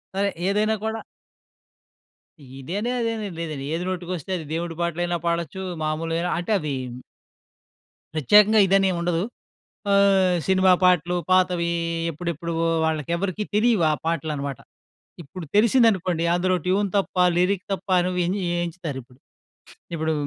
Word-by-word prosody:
సరే 200 Hz, +1 st, +1 dB, 0.2 s
ఏదైనా 215 Hz, +2 st, +2 dB
కూడా. 220 Hz, 0 st, -2 dB, 1.6 s
ఇదనీ 195 Hz, -, -3 dB
అదనీ 230 Hz, -2 st, -2 dB
ఏం -, -, -7 dB
లేదండి 155 Hz, -5 st, -4 dB
ఏది 175 Hz, -, -3 dB
నోటికొస్తే 180 Hz, -1 st, -4 dB
అది 160 Hz, -, -7 dB
దేవుడి 165 Hz, 0 st, -3 dB
పాటలైనా 175 Hz, +1 st, -1 dB
పాడొచ్చు, 170 Hz, +2 st, -2 dB, 0.2 s
మామూలుగైనా 165 Hz, +3 st, -1 dB
అంటే 175 Hz, +5 st, -4 dB
అది 150 Hz, -3 st, -3 dB, 1.4 s
ప్రత్యేకంగా 210 Hz, -, +5 dB
ఇదని 195 Hz, 0 st, +4 dB
ఏం -, -, -2 dB
ఉండదు. 170 Hz, 0 st, 0 dB, 0.7 s
ఆహ్, 195 Hz, -2 st, +4 dB
సినిమా 190 Hz, -1 st, +5 dB
పాటలు, 180 Hz, -1 st, +3 dB, 0.2 s
పాతవి 180 Hz, -2 st, +3 dB, 0.4 s
ఎప్పుడెప్పువో 165 Hz, 0 st, -3 dB, 0.2 s
వాళ్ళకి 160 Hz, 0 st, -2 dB
ఎవరికీ 200 Hz, +3 st, -2 dB
తెలియవు 215 Hz, -4 st, +3 dB
ఆ -, -, +2 dB
పాటలు 160 Hz, -2 st, -1 dB
అన్నమాట. 140 Hz, -2 st, -4 dB, 0.6 s
ఇప్పుడు 175 Hz, +4 st, -9 dB
తెలిసిందనుకోండి, 210 Hz, -7 st, +3 dB
అందులో 185 Hz, +1 st, +1 dB
ట్యూన్ 195 Hz, +2 st, +1 dB
తప్పా, 185 Hz, -2 st, +1 dB
లిరిక్ 185 Hz, +2 st, +1 dB
తప్పా 185 Hz, -1 st, 0 dB
నువ్వు 180 Hz, 0 st, -1 dB
అని 195 Hz, +3 st, -1 dB, 0.2 s
ఎంచుతారిప్పుడు. 140 Hz, -8 st, -7 dB, 0.8 s
ఇప్పుడు 160 Hz, 0 st, -1 dB
180 Hz, 125 wpm, -23 LUFS, 165-195 Hz, 1.6 s, ప్రత్యేకంగా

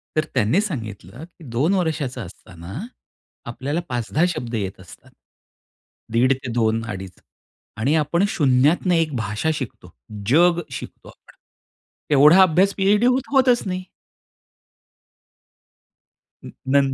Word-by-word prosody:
तर 155 Hz, 0 st, +1 dB
त्यांनी 130 Hz, -, +2 dB
सांगितलं, 115 Hz, -, -6 dB
की 170 Hz, -1 st, -20 dB
2 140 Hz, +11 st, +1 dB
वर्षाचा 155 Hz, -8 st, -2 dB
असताना 90 Hz, -, -10 dB, 0.7 s
आपल्याला 135 Hz, +7 st, -3 dB
5-10 125 Hz, +6 st, -1 dB
शब्द 120 Hz, -9 st, -4 dB
येत 95 Hz, -3 st, -4 dB
असतात. 95 Hz, -1 st, -15 dB, 1.0 s
दीड 125 Hz, +3 st, +3 dB
ते 130 Hz, -2 st, -7 dB
2 115 Hz, -1 st, +1 dB
अडीच 95 Hz, -2 st, -7 dB, 0.6 s
आणि 135 Hz, +8 st, +1 dB
आपण 165 Hz, +4 st, +1 dB
शून्यातनं 150 Hz, +3 st, +2 dB
एक 160 Hz, -4 st, 0 dB
भाषा 110 Hz, +6 st, -2 dB
शिकतो. 130 Hz, -6 st, -7 dB, 0.3 s
जग 170 Hz, +6 st, +4 dB
शिकतो. -, -, -9 dB
आपण -, -, -19 dB, 0.8 s
एवढा 150 Hz, +7 st, +7 dB
अभ्यास 185 Hz, +3 st, +3 dB
पी-एच-डी 205 Hz, +4 st, +2 dB
होत-होतच 255 Hz, -1 st, +3 dB
नाही. 185 Hz, 0 st, -3 dB, 2.6 s
न, -, -, -9 dB, 0.2 s
नंतर 135 Hz, 0 st, +3 dB
140 Hz, 115 wpm, -21 LUFS, 115-175 Hz, 2.6 s, एवढा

